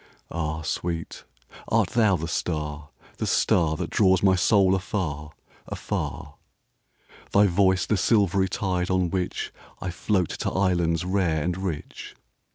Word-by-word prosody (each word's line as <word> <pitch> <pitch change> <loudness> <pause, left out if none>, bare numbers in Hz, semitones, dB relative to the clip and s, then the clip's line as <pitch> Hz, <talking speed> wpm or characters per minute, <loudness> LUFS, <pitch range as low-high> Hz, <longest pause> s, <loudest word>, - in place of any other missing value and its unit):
Ah, 80 -1 -3
sweet, 85 +1 -4 0.4
art - - +2
thou 110 -5 +3
the 80 -1 -3
star, 75 -3 -3 0.3
the - - -2
starThat 80 -3 +1
draws 95 -2 +3
my 95 -1 +5
soul 95 +1 +4
afar, 85 -6 -2 0.4
afar? - - -4 1.0
Thy 100 +1 +6
voice 95 0 +3
the 110 - +1
silvery 95 -2 +2
tide 90 -2 -1
on 90 -2 +1
whichI 90 0 -4
float 95 -1 0
to - - -3
islands 85 -3 +1
rare 90 -5 +1
and 90 +2 -1
rich? 90 -5 -6
90 Hz, 125 wpm, -25 LUFS, 80-95 Hz, 1.0 s, Thy